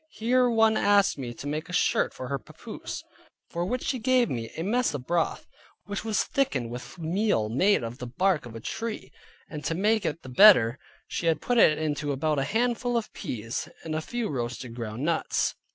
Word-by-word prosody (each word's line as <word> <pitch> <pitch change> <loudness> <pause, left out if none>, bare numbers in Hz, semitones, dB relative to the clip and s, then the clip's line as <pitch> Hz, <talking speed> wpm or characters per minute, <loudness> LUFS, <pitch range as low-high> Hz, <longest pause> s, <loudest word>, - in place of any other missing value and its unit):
Here 250 +2 +2
one 225 -1 +4
asked 200 -6 +3
me 125 -3 -4
to - - -9
make 155 +4 -3
a - - -7
shirt - - +2
for 130 - -7
her 140 - -1
papoose, 105 - -8 0.5
for 170 - -2
which 250 +6 -2
she 260 - -1
gave 250 +1 +2
me 115 -2 -3
a 165 - -2
mess 235 -2 +1
of 130 -3 -6
broth, 170 +1 0 0.4
which 205 0 -4
was 220 -2 +1
thickened 135 - -1
with 125 +8 -8
meal 170 - 0
made 185 - +3
of 115 +3 -6
the 125 - -5
bark 165 +2 +1
of 115 - -11
a - - -5
tree, 225 - -5 0.4
and 150 -2 -7
to 165 - -1
make 210 +3 +2
it 165 -1 -3
the - - -10
better, 125 - +7 0.3
she 170 - -3
had 165 - +2
put 245 -1 +1
into 150 -4 +3
it - - +1
about 150 +1 0
a - - +1
handful 240 - 0
of 230 - -4
peas, 115 0 -4
and 160 - -4
a 155 - -1
few 240 +6 -3
roasted 125 - -4
ground 115 +1 -5
nuts. 165 -1 0
165 Hz, 205 wpm, -27 LUFS, -, 0.5 s, better